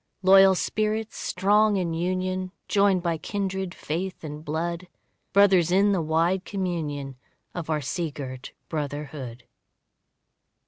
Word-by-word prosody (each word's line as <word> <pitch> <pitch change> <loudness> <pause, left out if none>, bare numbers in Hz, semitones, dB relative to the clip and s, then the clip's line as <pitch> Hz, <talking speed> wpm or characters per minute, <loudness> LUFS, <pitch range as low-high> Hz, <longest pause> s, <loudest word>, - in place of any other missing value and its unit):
Loyal 195 0 +7
spirits 215 +3 -1
strong 210 +1 +2
in 175 -3 -1
union, 185 +2 -2 0.2
Joined 200 -3 +3
by 165 -2 -1
kindred 190 -2 -3
faith 180 +5 -4
and 150 0 -7
blood; 170 +3 -3 0.4
Brothers 190 -4 +5
in 195 +3 +4
the 190 -4 +1
wide 165 +4 +1
communion 155 -9 -3 0.4
Of 170 -3 -5
our 155 -1 0
sea 160 +4 -2
girt 130 -3 -7 0.2
brotherhood. 145 -5 -5
175 Hz, 120 wpm, -25 LUFS, 155-190 Hz, 0.4 s, Loyal